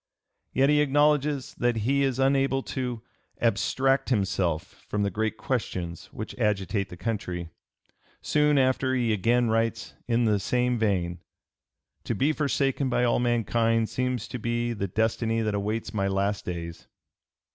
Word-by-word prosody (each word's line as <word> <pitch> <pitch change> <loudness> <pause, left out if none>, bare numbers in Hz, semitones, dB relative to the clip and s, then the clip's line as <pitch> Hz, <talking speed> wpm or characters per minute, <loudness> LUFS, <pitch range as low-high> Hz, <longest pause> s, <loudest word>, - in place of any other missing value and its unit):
Yet 135 +2 +3
he 150 0 +4
acknowledges 145 -1 +2
that 120 -1 +2
he 140 +2 +2
is 135 -3 +1
unable 135 0 +2
to 125 -3 -4 0.4
"abstract 135 +3 +1
himself 95 -8 -1
from 105 -1 0
the 100 - 0
great 110 +3 -1
questions 90 -8 -3
which - - -7
agitate 100 -1 0
the 90 - -9
country." 90 -4 -3 0.7
Soon 150 -1 +2
after 130 0 +2
he 120 -3 +1
again 115 +4 +2
writes 115 0 -1
in 120 0 +2
the 105 -2 +2
same 125 +4 0
vein: 90 -5 0 0.9
"To - - -1
be 145 +4 +2
forsaken 140 -2 0
by 125 - +1
all 120 - +2
mankind 115 -1 +1
seems 125 -3 -2
to 125 - -5
be 120 +1 -1
the 100 -3 -3
destiny 115 +3 0
that 110 -1 -1
awaits 105 +2 -2
my 100 -2 0
last 100 +1 -1
days." 85 -1 -6
115 Hz, 145 wpm, -27 LUFS, 105-130 Hz, 0.9 s, he